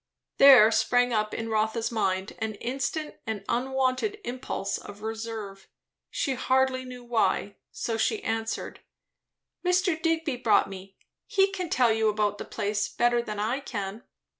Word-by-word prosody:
There 260 -6 +9
sprang 245 +2 +2
up 215 -1 0
in 225 0 -4
Rotha's 220 +1 0
mind 190 -3 -1
an 220 -1 -3
instant 275 +7 -3
and 210 -3 -4
unwonted 265 - 0
impulse 245 -5 -3
of 205 +1 -11
reserve; 220 -3 -6 0.4
she 275 - -1
hardly 260 0 +1
knew 250 -1 -9
why. 210 -4 0
So 230 -2 -3
she 410 - 0
answered, 225 0 -3 0.8
"Mr. 360 -2 +2
Digby 325 -5 0
brought 220 -5 +3
me; 195 0 -10 0.3
he 390 0 +3
can 365 -3 -4
tell 245 -6 +3
you 220 0 +2
about 205 -1 0
the - - -5
place 205 0 -2
better 240 0 +2
than 215 -3 -5
I 225 +6 0
can." 205 -5 -5
230 Hz, 145 wpm, -27 LUFS, 215-260 Hz, 0.8 s, There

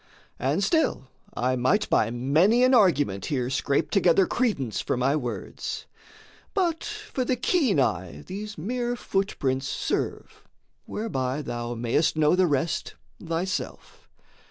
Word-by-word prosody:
And 145 +9 0
still 195 - +1 0.3
I 130 +1 +1
might 155 - +2
by 110 - +2
many 155 - +3
an 255 +1 +5
argument 145 - +3
Here 130 -3 -1
scrape 140 +1 0
together 190 -2 +4
credence 190 - -1
for - - -1
my 130 +4 +2
words. 125 -6 -4 0.7
But 345 -5 +1
for 425 -11 -4
the 250 +1 0
keen 250 - +2
eye 90 -8 -1
these 210 +3 -6
mere 240 +8 -2
footprints 140 - -1
serve, - - -3 0.4
Whereby 140 - -2
thou 120 -1 -4
mayest 120 +8 +1
know 155 +2 +4
the 185 0 +3
rest 155 +3 -1 0.3
thyself. 170 +3 -4
160 Hz, 130 wpm, -26 LUFS, 130-215 Hz, 0.7 s, an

